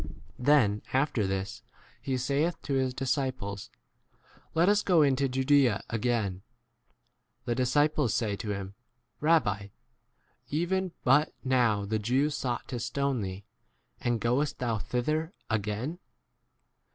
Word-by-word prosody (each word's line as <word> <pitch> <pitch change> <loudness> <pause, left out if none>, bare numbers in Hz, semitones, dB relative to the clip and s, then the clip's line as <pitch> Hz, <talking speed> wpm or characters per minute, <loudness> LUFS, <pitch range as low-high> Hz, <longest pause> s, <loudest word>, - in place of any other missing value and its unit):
Then, 125 -7 +4
after 130 -6 +1
this, 95 +5 -3 0.4
he 130 -2 -1
saith 140 +7 0
to 140 - -2
his 130 -1 +2
z 125 - -9
disciples, 130 -7 -2 0.9
Let 165 +2 +4
us 205 +1 +4
go 175 -5 +4
into 140 -1 +2
8 - - 0
Judaea 130 -4 +3
again. 110 -5 0 1.0
The 120 - 0
disciples 145 +1 +2
say 105 -3 0
to 105 - -5
him, 100 -1 -4 0.5
Rabbi, 105 - +2 0.8
[even 175 +4 0
but] 145 +4 +4
now 120 -6 +2
the 110 +2 -1
Jews 130 +7 +1
sought 125 -3 -3
to 125 - -3
stone 130 +1 -1
thee, 95 0 -5 0.5
and 120 - 0
9 - - 0
goest 125 +6 0
thou 115 -3 -1
thither 155 - -1 0.2
again 110 - -2
125 Hz, 130 wpm, -29 LUFS, 110-145 Hz, 1.0 s, Then